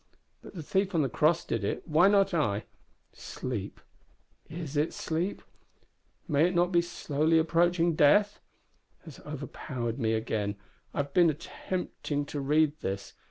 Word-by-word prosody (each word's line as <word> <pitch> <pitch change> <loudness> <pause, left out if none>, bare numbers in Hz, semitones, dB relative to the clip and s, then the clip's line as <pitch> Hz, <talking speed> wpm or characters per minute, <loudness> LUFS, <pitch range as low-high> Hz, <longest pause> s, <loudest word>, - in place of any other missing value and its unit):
But - - -13
the 165 - -6
thief 190 +4 0
on 160 - +3
the 135 - 0
cross 155 +8 +2
did 115 -3 -2
it; 100 - -3
why 160 +4 +5
not 195 -1 +3
I? 110 -11 0 0.5
Sleep 110 -6 -6 0.7
is 160 -3 -6
it 150 +2 0
sleep? 170 +5 -2 0.8
may 155 0 +3
it 180 - -3
not 175 +1 +3
be 170 -1 +4
slowly 160 -2 0
approaching 170 +1 +2
death? 200 +8 +4 0.7
has 160 -5 -11
overpowered 130 -4 -5
me 110 -2 +1
again. 110 -2 -2 0.4
I - - 0
have 140 0 -14
been 175 -2 +5
attempting 155 -2 -4
to 145 - -5
read 150 +2 +2
this. 100 +1 -4
155 Hz, 150 wpm, -29 LUFS, 135-175 Hz, 0.8 s, why